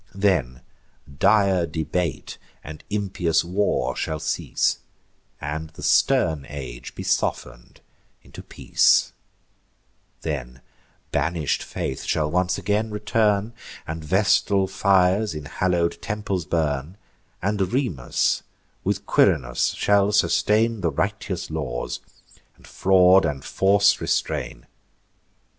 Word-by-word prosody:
Then 90 -11 0 0.6
dire 100 -6 +3
debate 80 +2 -3 0.2
and 75 0 -10
impious 95 -6 0
war 100 +4 0
shall 80 -1 -3
cease, 75 - -1 0.6
And 80 +2 -5
the 80 - -12
stern 85 - +2
age 60 -4 -8
be - - -6
soften'd - - -2 0.4
into - - -11
peace: - - +2 1.1
Then 60 +1 -5 0.5
banish'd 75 0 0
Faith - - -4
shall 75 -1 0
once 90 +1 +1
again 105 +4 -1
return, 105 0 0 0.3
And 80 +1 -6
Vestal 95 +3 +2
fires 95 0 +2
in 75 -1 -6
hallow'd 85 +1 -1
temples 100 -5 -3
burn; 75 +1 -2 0.4
And 100 +1 -1
Remus 115 - 0 0.4
with 100 +1 -2
Quirinus 70 -14 +2
shall 100 0 +2
sustain 110 +1 +2
The 85 - +1
righteous 100 -2 -3
laws, 70 -6 -4 0.6
and - - -20
fraud 95 0 +4
and 70 -3 -3
force 100 +1 +3
restrain. - - -2
90 Hz, 105 wpm, -23 LUFS, 75-100 Hz, 1.1 s, fraud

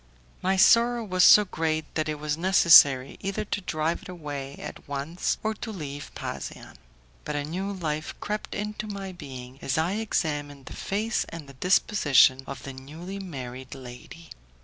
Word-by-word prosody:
My 190 +1 +1
sorrow 235 +4 +5
was 185 -3 +2
so 210 - +9
great 160 -3 -2
that 155 -1 -1
it 155 - -2
was 150 0 -2
necessary 160 -7 +6
either 200 +2 -3
to 205 - -3
drive 160 -2 -1
it - - -12
away 145 -5 -6
at - - -9
once 145 +5 -2
or 220 0 0
to 220 +1 -7
leave 145 -7 -6
Pasean. - - -7 0.5
But 150 - -4
a 145 - -1
new 185 +7 -3
life 155 -5 -3
crept 210 +1 -4
into 210 +1 -4
my 195 -2 -5
being 130 -6 -10
as 135 - -1
I 160 +3 +1
examined 145 -10 -2
the - - -9
face 215 +3 -1
and 165 -4 -8
the 140 - -12
disposition 145 - +4
of 140 - -7
the 135 - -7
newly 160 +9 -8
married 130 -8 -7
lady. 130 +6 -11
160 Hz, 170 wpm, -26 LUFS, 140-195 Hz, 0.5 s, so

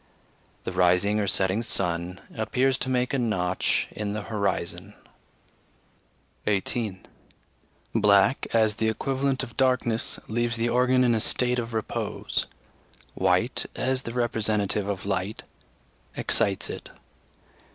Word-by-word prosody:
The - - -3
rising 90 +4 +3
or 100 - 0
setting 95 +2 +2
sun 90 -3 -1 0.2
appears 130 +4 +1
to 130 - -1
make 125 0 0
a 135 - +1
notch 95 -6 0
in 105 -1 -3
the 105 -1 -3
horizon. 100 -2 -2 1.5
18. 100 -1 -1 0.9
Black, 105 +3 +4
as 110 -2 +2
the 110 0 +1
equivalent 135 +3 -1
of 120 -3 -8
darkness, 125 -3 +1
leaves 120 +1 0
the 115 +1 0
organ 125 +1 +3
in 120 -1 +4
a 115 - +2
state 125 +3 +2
of 115 0 -4
repose; 110 - -2 0.7
white, - - +1
as 130 +1 0
the 115 - -6
representative 105 -4 0
of 100 -1 -3
light, 100 +1 -2 0.7
excites 100 -4 +1
it. - - -7
110 Hz, 120 wpm, -26 LUFS, 100-125 Hz, 1.5 s, Black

